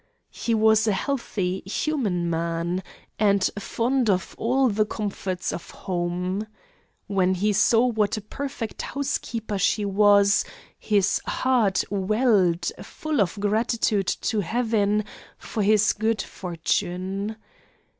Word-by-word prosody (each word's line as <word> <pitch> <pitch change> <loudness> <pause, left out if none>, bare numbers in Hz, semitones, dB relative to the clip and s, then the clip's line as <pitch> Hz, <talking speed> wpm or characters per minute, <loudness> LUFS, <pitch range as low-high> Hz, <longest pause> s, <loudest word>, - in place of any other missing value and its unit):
He 230 - -1
was 220 0 +4
a 210 - +3
healthy, 190 -6 -2
human 200 - -1
man, 170 +2 -1 0.4
and 200 -2 +3
fond 240 +3 0
of 185 -2 0
all 260 +3 +2
the 215 -2 +2
comforts 200 -4 -3
of 170 - -7
home. 180 +3 -3 0.6
When 190 -2 +1
he 205 +3 +1
saw 225 +4 +4
what 220 -4 +1
a - - -4
perfect 235 0 -5
housekeeper 235 -6 -3
she 205 +2 +1
was, 200 0 +4 0.4
his 200 -2 +1
heart 235 -7 +2
welled 195 -4 +2
full 310 -6 -2
of 195 +1 -1
gratitude 210 -1 +1
to 215 +4 -1
heaven 215 0 +1 0.3
for 220 - -4
his 210 +1 +4
good 220 -1 0
fortune. 185 +4 -3
205 Hz, 115 wpm, -24 LUFS, 190-225 Hz, 0.6 s, was